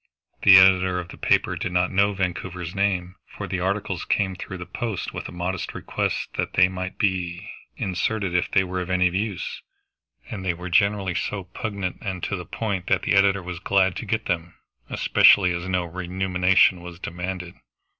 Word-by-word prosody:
The 100 Hz, -2 st, +9 dB
editor 95 Hz, -1 st, +5 dB
of 90 Hz, 0 st, -7 dB
the -, -, -10 dB
paper -, -, +2 dB
did -, -, -3 dB
not 90 Hz, 0 st, +1 dB
know 100 Hz, +2 st, +3 dB
Vancouver's 90 Hz, -2 st, -3 dB
name, 95 Hz, -2 st, -1 dB, 0.2 s
for -, -, -4 dB
the 90 Hz, -, -2 dB
articles 95 Hz, 0 st, -2 dB
came 95 Hz, -2 st, 0 dB
through 95 Hz, +1 st, -7 dB
the 90 Hz, -, -7 dB
post 110 Hz, +2 st, -4 dB
with -, -, -6 dB
a -, -, -9 dB
modest 90 Hz, +1 st, -4 dB
request -, -, -2 dB
that -, -, -2 dB
they 90 Hz, -, +5 dB
might 95 Hz, 0 st, -5 dB
be 90 Hz, -3 st, -1 dB, 0.3 s
inserted 95 Hz, 0 st, -1 dB
if 90 Hz, -, +1 dB
they 95 Hz, -, +3 dB
were 90 Hz, 0 st, -3 dB
of 90 Hz, -, -6 dB
any 90 Hz, -1 st, +3 dB
use; 100 Hz, +1 st, -3 dB, 0.7 s
and 100 Hz, -4 st, -6 dB
they 90 Hz, -2 st, 0 dB
were 90 Hz, +2 st, -7 dB
generally 100 Hz, -1 st, +2 dB
so 100 Hz, +2 st, -3 dB
pungent 100 Hz, -1 st, -5 dB
and 95 Hz, -3 st, -4 dB
to 100 Hz, -, -1 dB
the 90 Hz, -2 st, -6 dB
point 100 Hz, -2 st, -3 dB
that 95 Hz, -1 st, +2 dB
the -, -, +1 dB
editor 100 Hz, -1 st, +4 dB
was 90 Hz, -1 st, -6 dB
glad 95 Hz, -1 st, +2 dB
to -, -, -5 dB
get 110 Hz, +3 st, -1 dB
them, 85 Hz, -2 st, -2 dB, 0.3 s
especially 90 Hz, -3 st, +5 dB
as 85 Hz, +2 st, -4 dB
no 90 Hz, -1 st, +1 dB
remuneration 90 Hz, +1 st, +2 dB
was 85 Hz, -1 st, -9 dB
demanded. 90 Hz, 0 st, -5 dB
95 Hz, 185 wpm, -24 LUFS, 90-95 Hz, 0.7 s, The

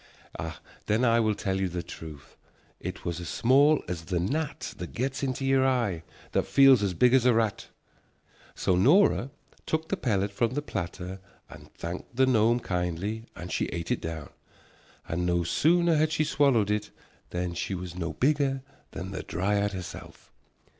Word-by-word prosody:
Then 110 Hz, +4 st, +2 dB
I 115 Hz, 0 st, +4 dB
will 110 Hz, -2 st, +2 dB
tell 95 Hz, -1 st, -2 dB
you 95 Hz, -, 0 dB
the 85 Hz, 0 st, -4 dB
truth. 75 Hz, -3 st, -10 dB, 0.4 s
It -, -, -6 dB
was 85 Hz, -1 st, -2 dB
as 85 Hz, -2 st, -6 dB
small 140 Hz, +5 st, +4 dB
as 85 Hz, -2 st, -5 dB
the 90 Hz, 0 st, -1 dB
gnat 145 Hz, -, -2 dB
that 90 Hz, -, -6 dB
gets 135 Hz, +3 st, -2 dB
into 135 Hz, -1 st, -2 dB
your 135 Hz, 0 st, +3 dB
eye, 120 Hz, -10 st, +1 dB, 0.3 s
that -, -, 0 dB
feels 135 Hz, -4 st, +6 dB
as 95 Hz, -3 st, -1 dB
big 125 Hz, +6 st, +4 dB
as 130 Hz, -2 st, +5 dB
a 120 Hz, -, +5 dB
rat." 110 Hz, -3 st, 0 dB, 0.9 s
So 95 Hz, -, +1 dB
Nora 140 Hz, -, +4 dB, 0.4 s
took 160 Hz, 0 st, -1 dB
the -, -, +1 dB
pellet 100 Hz, -, 0 dB
from 115 Hz, +4 st, 0 dB
the 145 Hz, -, -1 dB
platter 95 Hz, -, -5 dB, 0.3 s
and -, -, -13 dB
thanked 85 Hz, +7 st, -7 dB
the 130 Hz, +1 st, +4 dB
gnome 120 Hz, -1 st, +3 dB
kindly 90 Hz, +5 st, -2 dB
and 90 Hz, -, -7 dB
she -, -, 0 dB
ate 85 Hz, -1 st, -4 dB
it -, -, 0 dB
down, 80 Hz, -2 st, -5 dB, 0.8 s
and 85 Hz, +2 st, -2 dB
no 85 Hz, -1 st, +1 dB
sooner 170 Hz, -, +3 dB
had 155 Hz, +1 st, +2 dB
she 155 Hz, -, +1 dB
swallowed 135 Hz, -9 st, +2 dB
it 105 Hz, 0 st, -1 dB, 0.4 s
than 90 Hz, 0 st, -3 dB
she 95 Hz, +3 st, -3 dB
was 90 Hz, -1 st, -6 dB
no 85 Hz, -3 st, -3 dB
bigger 135 Hz, -, +1 dB, 0.3 s
than 95 Hz, +1 st, -6 dB
the 95 Hz, -, -4 dB
dryad 100 Hz, +3 st, 0 dB
herself. 90 Hz, -1 st, -9 dB
105 Hz, 175 wpm, -28 LUFS, 90-130 Hz, 0.9 s, feels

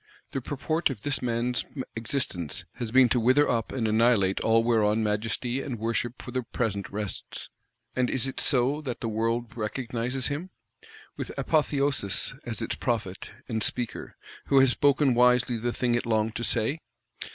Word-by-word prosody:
The 135 Hz, -, -3 dB
purport 155 Hz, +5 st, -1 dB
of 120 Hz, -7 st, -6 dB
this 145 Hz, -1 st, 0 dB
man's 120 Hz, 0 st, 0 dB, 0.3 s
existence 115 Hz, -, -2 dB
has 120 Hz, -, -3 dB
been 130 Hz, +2 st, +6 dB
to 120 Hz, -, +2 dB
wither 130 Hz, +6 st, +4 dB
up 115 Hz, -2 st, 0 dB
and 120 Hz, -4 st, -1 dB
annihilate 110 Hz, -3 st, +3 dB
all 115 Hz, 0 st, +3 dB
whereon 110 Hz, -2 st, +2 dB
Majesty 115 Hz, +4 st, -1 dB
and 130 Hz, -4 st, -4 dB
Worship 115 Hz, +2 st, -2 dB
for 125 Hz, -, -8 dB
the 130 Hz, +1 st, -1 dB
present 105 Hz, -5 st, -3 dB
rests: 105 Hz, -1 st, -4 dB, 0.4 s
and 125 Hz, -1 st, +1 dB
is 130 Hz, 0 st, +2 dB
it 135 Hz, -, -4 dB
so 135 Hz, +3 st, +2 dB
that 130 Hz, -5 st, -5 dB
the 115 Hz, -, -2 dB
world 115 Hz, +1 st, -1 dB
recognises 120 Hz, +3 st, -2 dB
him? 150 Hz, +6 st, -2 dB, 0.7 s
With -, -, -4 dB
Apotheosis; 140 Hz, -, +1 dB
as -, -, -2 dB
its -, -, -2 dB
Prophet 105 Hz, -6 st, -3 dB, 0.2 s
and 110 Hz, -3 st, -2 dB
Speaker, 120 Hz, +2 st, -3 dB, 0.3 s
who 140 Hz, -, +3 dB
has 135 Hz, -1 st, +5 dB
spoken 140 Hz, 0 st, +3 dB
wisely 125 Hz, 0 st, +4 dB
the 120 Hz, +2 st, -1 dB
thing 120 Hz, 0 st, 0 dB
it 120 Hz, 0 st, 0 dB
longed 110 Hz, -1 st, +1 dB
to 120 Hz, -, -4 dB
say? 120 Hz, +7 st, 0 dB
120 Hz, 165 wpm, -27 LUFS, 110-130 Hz, 0.7 s, been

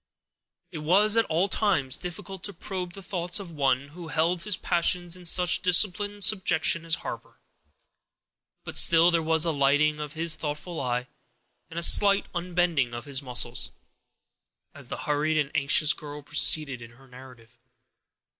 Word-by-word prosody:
It 165 Hz, -, -7 dB
was 195 Hz, +8 st, +2 dB
at 225 Hz, -, +2 dB
all 165 Hz, +4 st, 0 dB
times 185 Hz, -11 st, 0 dB
difficult 180 Hz, +1 st, -8 dB
to 200 Hz, -, -5 dB
probe 180 Hz, -1 st, -6 dB
the 195 Hz, -, -10 dB
thoughts 180 Hz, 0 st, -2 dB
of 190 Hz, -4 st, -9 dB
one 140 Hz, -2 st, -1 dB
who 170 Hz, +2 st, -11 dB
held 165 Hz, +2 st, -1 dB
his 185 Hz, 0 st, -1 dB
passions 175 Hz, 0 st, -1 dB
in 180 Hz, -1 st, -14 dB
such 180 Hz, +1 st, +4 dB
disciplined 205 Hz, +3 st, +1 dB
subjection 170 Hz, -5 st, +2 dB
as 165 Hz, -1 st, +1 dB
Harper, -, -, -8 dB, 1.3 s
but -, -, -4 dB
still 170 Hz, +1 st, +6 dB
there 170 Hz, -1 st, +1 dB
was 160 Hz, 0 st, +1 dB
a 165 Hz, -, 0 dB
lighting 145 Hz, +1 st, +1 dB
of 150 Hz, -1 st, -7 dB
his 165 Hz, 0 st, 0 dB
thoughtful 155 Hz, +2 st, -6 dB
eye, 125 Hz, -1 st, -2 dB, 0.6 s
and 165 Hz, -, -11 dB
a 170 Hz, -, +1 dB
slight 200 Hz, +3 st, +5 dB
unbending 170 Hz, -8 st, -1 dB
of 120 Hz, -, -8 dB
his 140 Hz, -1 st, -3 dB
muscles, 125 Hz, -2 st, -3 dB, 1.0 s
as -, -, -11 dB
the -, -, -6 dB
hurried 150 Hz, +1 st, -1 dB
and 150 Hz, -2 st, -1 dB
anxious 145 Hz, +1 st, +3 dB
girl 150 Hz, -1 st, -10 dB
proceeded 145 Hz, -2 st, +2 dB
in 115 Hz, 0 st, -13 dB
her 135 Hz, +2 st, -20 dB
narrative. 125 Hz, -2 st, -16 dB
160 Hz, 160 wpm, -26 LUFS, 145-180 Hz, 1.3 s, still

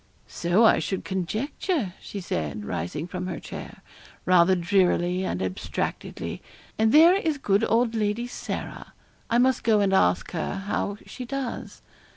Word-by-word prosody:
'So 175 Hz, +7 st, +2 dB
I -, -, +5 dB
should 190 Hz, -, -3 dB
conjecture,' 215 Hz, -, -2 dB
she 200 Hz, -, -7 dB
said, 85 Hz, -, -3 dB
rising 90 Hz, -, -3 dB
from 180 Hz, +1 st, -5 dB
her 180 Hz, -, -4 dB
chair, -, -, -9 dB, 0.4 s
rather 185 Hz, 0 st, +5 dB
drearily 180 Hz, 0 st, +2 dB
and 95 Hz, -, -2 dB
abstractedly, 95 Hz, 0 st, -4 dB, 0.4 s
'and 220 Hz, 0 st, +4 dB
there 325 Hz, +5 st, +8 dB
is 320 Hz, -6 st, 0 dB
good 205 Hz, -5 st, +1 dB
old 230 Hz, 0 st, +2 dB
Lady 215 Hz, +1 st, 0 dB
Sarah. 245 Hz, -, -6 dB, 0.4 s
I 235 Hz, -, +3 dB
must 255 Hz, +1 st, +3 dB
go 220 Hz, -2 st, +4 dB
and 195 Hz, -1 st, +2 dB
ask 90 Hz, -, +2 dB
her 165 Hz, +3 st, -3 dB
how 205 Hz, 0 st, -2 dB
she 255 Hz, -, -8 dB
does.' 260 Hz, -1 st, -5 dB
200 Hz, 150 wpm, -25 LUFS, 175-235 Hz, 0.4 s, there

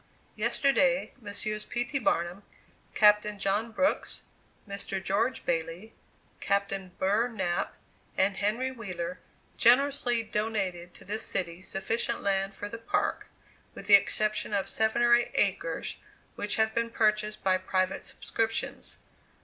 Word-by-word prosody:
Yesterday 275 Hz, -1 st, +2 dB
Messrs. 210 Hz, 0 st, -3 dB
P. 240 Hz, +2 st, -2 dB
T. 275 Hz, +2 st, -2 dB
Barnum, 175 Hz, -4 st, 0 dB, 0.5 s
Captain 210 Hz, 0 st, +5 dB
John 200 Hz, +4 st, 0 dB
Brooks, 280 Hz, +6 st, 0 dB, 0.4 s
Mr. 200 Hz, -1 st, -4 dB
George 210 Hz, +7 st, 0 dB
Bailey, 165 Hz, +6 st, -2 dB, 0.5 s
Captain 195 Hz, -1 st, -1 dB
Burr 210 Hz, +5 st, +2 dB
Knapp, 190 Hz, -7 st, -2 dB, 0.4 s
and 195 Hz, +1 st, +2 dB
Henry 230 Hz, +7 st, 0 dB
Wheeler 180 Hz, -7 st, -5 dB, 0.4 s
generously 245 Hz, -1 st, +4 dB
donated 200 Hz, -5 st, -2 dB
to -, -, -14 dB
this 215 Hz, +3 st, -3 dB
city 170 Hz, -1 st, -2 dB
sufficient 195 Hz, +5 st, -2 dB
land 195 Hz, 0 st, 0 dB
for 205 Hz, -, -5 dB
the 230 Hz, +2 st, -7 dB
Park, 410 Hz, -, -1 dB, 0.5 s
with -, -, -9 dB
the 205 Hz, -, +4 dB
exception 210 Hz, +1 st, +3 dB
of 195 Hz, -, 0 dB
seven 220 Hz, +2 st, +1 dB
or 240 Hz, 0 st, +6 dB
eight 240 Hz, 0 st, +4 dB
acres, -, -, 0 dB, 0.4 s
which 205 Hz, 0 st, -2 dB
have 220 Hz, 0 st, +2 dB
been 230 Hz, 0 st, 0 dB
purchased 215 Hz, -2 st, +1 dB
by 185 Hz, -1 st, +3 dB
private 185 Hz, 0 st, -1 dB
subscriptions. 225 Hz, 0 st, -3 dB
210 Hz, 130 wpm, -29 LUFS, 195-230 Hz, 0.5 s, or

